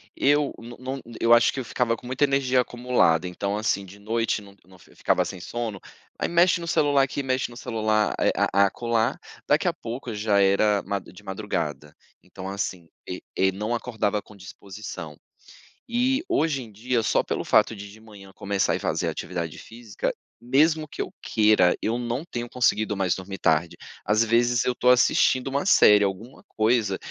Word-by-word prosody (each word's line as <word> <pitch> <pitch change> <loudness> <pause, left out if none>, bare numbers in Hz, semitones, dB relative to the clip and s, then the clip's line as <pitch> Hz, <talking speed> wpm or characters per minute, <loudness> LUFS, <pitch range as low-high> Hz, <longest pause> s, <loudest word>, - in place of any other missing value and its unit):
eu 145 0 +2
não 120 +1 -11
não 130 +1 -5 0.2
eu 115 +1 +5
acho 120 - +5
que 135 - -4
eu 125 - -4
ficava 115 -1 0
com 125 - -12
muita 130 +3 -1
energia 135 -2 +2
acumulada. 120 -10 +1
Então 100 +3 -3
assim 100 -2 -1
de 100 +2 -14
noite 115 +1 -1
não 100 -1 -15
não 95 0 -19
fi - - -21
ficava - - +1
sem 95 - -7
sono, 110 +1 -4 0.4
aí - - -1
mexe 175 +1 +3
no 170 - -6
celular 145 -3 +3
aqui, 135 +1 -2
mexe 130 -2 -1
no 120 - -11
celular, 110 -3 0
eh, - - +3
a 100 +1 +3
a - - +6
acolá. 115 +2 -1 0.3
Daqui - - +2
a - - +2
pouco 120 +1 -6
já 105 -1 +1
era 100 +1 +3
ma 100 -1 -2
de 90 - -15
madrugada. 85 -8 -4 0.3
Então 95 +1 -9
assim 95 -4 -4 0.2
e - - -6 0.2
e 95 0 +3
não 105 +5 -2
acordava 110 -4 -2
com 105 - -17
disposição. 95 -5 -9 0.7
E 260 +5 +1
hoje 160 - +1
em 115 -3 -11
dia, 120 +3 -1
só 110 - +1
pelo - - -3
fato 115 - +3
de 100 0 -9
de 110 - -15
manhã 100 -3 -14
começar 100 -1 0
e - - -3
fazer - - -1
atividade 85 -3 -4
física, 115 -2 -5 0.3
mesmo 155 +5 +2
que - - -6
eu - - -5
queira, 105 -5 +3
eu 115 +2 -1
não 120 +5 -3
tenho 120 -7 -5
conseguido 110 -4 +1
mais 95 -3 +1
dormir 95 0 -7
tarde. 80 +1 +1 0.3
Às 110 +3 +3
vezes 120 +1 +2
eu 125 - +1
tô 125 - +2
assistindo 125 +1 +4
uma 140 +5 -1
série, 105 - +6
alguma 100 +6 -4
coisa 110 -3 +1
110 Hz, 190 wpm, -25 LUFS, 100-125 Hz, 0.7 s, a